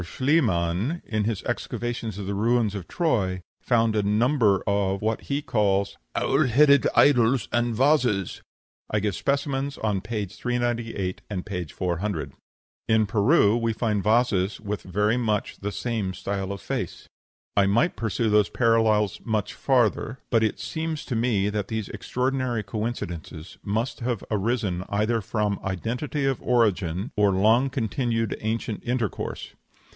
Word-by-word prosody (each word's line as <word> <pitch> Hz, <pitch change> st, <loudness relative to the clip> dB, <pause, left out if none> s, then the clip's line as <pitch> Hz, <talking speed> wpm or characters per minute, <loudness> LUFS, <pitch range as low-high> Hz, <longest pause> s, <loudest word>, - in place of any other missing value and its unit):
Schliemann, 115 Hz, -, +1 dB
in 110 Hz, -2 st, -1 dB
his 110 Hz, -3 st, -2 dB
excavations 115 Hz, -4 st, -3 dB
of 100 Hz, -, -5 dB
the 100 Hz, -, -2 dB
ruins 110 Hz, +1 st, +2 dB
of 100 Hz, -4 st, -6 dB
Troy, 95 Hz, -, 0 dB, 0.2 s
found 115 Hz, -2 st, +2 dB
a 105 Hz, -, +3 dB
number 105 Hz, 0 st, +2 dB
of 100 Hz, -1 st, +1 dB
what 110 Hz, +2 st, -1 dB
he 145 Hz, +1 st, -2 dB
calls 100 Hz, -4 st, +1 dB, 0.2 s
"owl 135 Hz, +1 st, +2 dB
headed 140 Hz, +3 st, +5 dB
idols" 125 Hz, -3 st, +4 dB
and 120 Hz, -1 st, +1 dB
vases. 125 Hz, -, +2 dB, 0.5 s
I 105 Hz, -, +1 dB
give 105 Hz, 0 st, -1 dB
specimens 140 Hz, -, -1 dB
on 105 Hz, -3 st, -1 dB
page 105 Hz, -2 st, -4 dB
398 120 Hz, -6 st, -2 dB
and 95 Hz, -4 st, -4 dB
page 90 Hz, -7 st, -4 dB
400. 85 Hz, -5 st, -2 dB, 0.5 s
In 110 Hz, -1 st, +4 dB
Peru 105 Hz, -, +4 dB
we 115 Hz, -1 st, 0 dB
find 110 Hz, -2 st, 0 dB
vases 105 Hz, -3 st, +2 dB
with 105 Hz, -1 st, -4 dB
very 105 Hz, +5 st, +1 dB
much 110 Hz, -4 st, -1 dB
the 105 Hz, +1 st, -3 dB
same 105 Hz, -5 st, -2 dB
style 100 Hz, 0 st, -3 dB
of 100 Hz, -2 st, -6 dB
face. -, -, -4 dB, 0.5 s
I 100 Hz, -1 st, +4 dB
might 120 Hz, -, +2 dB
pursue 110 Hz, 0 st, -1 dB
those 105 Hz, -1 st, +4 dB
parallels 110 Hz, -3 st, +2 dB
much 110 Hz, -4 st, -1 dB
farther; 125 Hz, -2 st, +1 dB
but 115 Hz, -2 st, +4 dB
it 110 Hz, -2 st, 0 dB
seems 160 Hz, +6 st, -4 dB
to 125 Hz, -, -3 dB
me 110 Hz, -4 st, +1 dB
that 105 Hz, -2 st, -2 dB
these 110 Hz, -3 st, -3 dB
extraordinary 125 Hz, -3 st, -1 dB
coincidences 95 Hz, -7 st, -5 dB
must 110 Hz, +5 st, -2 dB
have 120 Hz, -4 st, -2 dB
arisen 105 Hz, -4 st, 0 dB
either 110 Hz, +3 st, +1 dB
from 105 Hz, 0 st, -1 dB
identity 125 Hz, -, -2 dB
of 135 Hz, -2 st, 0 dB
origin 100 Hz, -, +1 dB
or 105 Hz, -1 st, +4 dB
long 110 Hz, +8 st, +3 dB
continued 115 Hz, -2 st, -1 dB
ancient 110 Hz, 0 st, -3 dB
intercourse. 120 Hz, -4 st, -3 dB
110 Hz, 145 wpm, -25 LUFS, 100-120 Hz, 0.5 s, headed